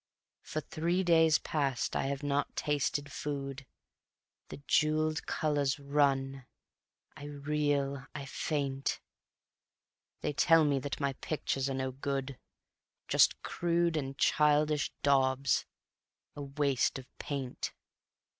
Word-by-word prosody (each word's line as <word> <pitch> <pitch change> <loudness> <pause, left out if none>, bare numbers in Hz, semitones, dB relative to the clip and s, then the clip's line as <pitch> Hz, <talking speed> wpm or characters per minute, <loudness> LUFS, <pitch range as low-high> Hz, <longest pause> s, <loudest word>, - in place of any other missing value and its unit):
For 155 - -4
three 170 +5 -1
days 165 -2 +5
past 140 -5 -1
I - - 0
have 140 +1 -3
not 145 0 -1
tasted 145 0 -1
food; 140 -2 -5 0.8
The - - -7
jeweled 155 0 +2
colors 145 -2 0
run... 135 -2 +1 0.7
I 145 - -9
reel, 145 -2 -1
I 140 - -5
faint; 140 -1 -2 1.2
They - - -1
tell 165 +2 +5
me 140 -2 +2
that 140 +1 -4
my 140 -2 0
pictures 135 -3 -1
are 135 - -2
no 130 0 -2
good, 135 -1 -3 0.7
Just - - +4
crude 170 -1 +1
and 135 -3 -3
childish 150 0 +3
daubs, 135 0 +2 0.7
a 145 - -6
waste 140 -2 0
of 130 - -9
paint. 135 -3 -4
140 Hz, 115 wpm, -32 LUFS, 135-150 Hz, 1.2 s, days